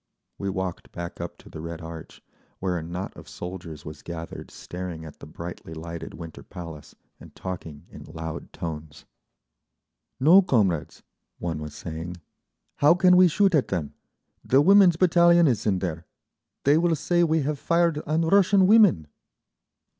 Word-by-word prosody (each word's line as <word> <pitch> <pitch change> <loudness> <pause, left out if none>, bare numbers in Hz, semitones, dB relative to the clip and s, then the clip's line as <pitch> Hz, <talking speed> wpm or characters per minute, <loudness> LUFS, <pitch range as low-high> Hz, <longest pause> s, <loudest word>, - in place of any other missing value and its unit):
We 100 - -2
walked 95 -2 -4
back 85 0 -7
up - - -6
to - - -18
the 80 - -9
Red 85 0 -6
Arch, 80 -1 -10 0.3
where 95 -1 -2
a 85 - -2
knot 90 +4 -6
of - - -12
soldiers 85 -4 -8
was 75 -1 -9
gathered 85 -1 -8
staring 90 -3 -7
at 75 - -12
the - - -11
brightly 85 0 -8
lighted 85 +1 -7
Winter 80 -2 -9
Palace 80 -4 -10 0.2
and - - -15
talking 85 -5 -7
in - - -11
loud 80 0 -7
tones. 80 -2 -7 1.1
"No, 165 +9 +7
comrades," 105 - 0 0.3
one 80 -3 -4
was 75 -1 -7
saying. 80 +3 -6 0.6
"How 150 +4 +5
can 180 0 +5
we 185 0 +7
shoot 195 +3 +2
at 150 -5 +3
them? 85 -6 -3 0.5
The 135 - +3
Women's 190 +2 +6
Battalion 170 0 +5
is 115 -5 0
in 100 -3 +2
there—they 90 - -3
will 170 -1 +2
say 175 +4 +1
we 160 -2 +2
have 145 0 -2
fired 170 -1 +2
on 155 +2 +1
Russian 195 +2 +4
women." 200 - +5
95 Hz, 155 wpm, -25 LUFS, -, 1.1 s, No